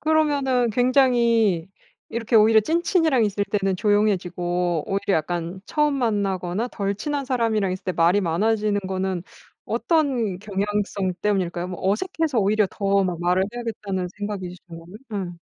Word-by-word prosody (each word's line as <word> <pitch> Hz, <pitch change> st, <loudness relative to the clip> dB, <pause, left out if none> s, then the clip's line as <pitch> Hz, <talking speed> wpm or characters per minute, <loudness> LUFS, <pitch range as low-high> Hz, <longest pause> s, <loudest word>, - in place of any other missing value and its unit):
그러면은 285 Hz, -6 st, +2 dB
굉장히 235 Hz, -7 st, +3 dB, 0.4 s
이렇게 230 Hz, 0 st, 0 dB
오히려 220 Hz, 0 st, +6 dB
찐친이랑 325 Hz, -, +2 dB
있을 205 Hz, 0 st, -1 dB
때는 195 Hz, -2 st, -1 dB
조용해지고 180 Hz, -5 st, 0 dB
오히려 195 Hz, 0 st, 0 dB
약간 175 Hz, +3 st, -4 dB
처음 300 Hz, -1 st, +1 dB
만나거나 200 Hz, -3 st, -1 dB
덜 200 Hz, -3 st, -2 dB
친한 285 Hz, +6 st, -3 dB
사람이랑 225 Hz, -7 st, 0 dB
있을 185 Hz, -, -7 dB
때 185 Hz, -, -1 dB
말이 170 Hz, +4 st, +3 dB
많아지는 210 Hz, +4 st, +1 dB
거는 190 Hz, -2 st, -2 dB, 0.4 s
어떤 260 Hz, -, 0 dB
경향성 200 Hz, -1 st, -2 dB
때문일까요? 180 Hz, -4 st, -1 dB
뭐 180 Hz, -2 st, -6 dB
어색해서 315 Hz, -, -1 dB
오히려 210 Hz, +1 st, +3 dB
더 200 Hz, -1 st, +1 dB
막 175 Hz, -2 st, -3 dB
말을 180 Hz, +2 st, +2 dB
해야겠다는 210 Hz, -6 st, -4 dB
생각이신 200 Hz, -3 st, -5 dB
거면 165 Hz, -1 st, -10 dB, 0.3 s
음. 175 Hz, -4 st, -4 dB
205 Hz, 345 characters per minute, -23 LUFS, 185-235 Hz, 0.4 s, 오히려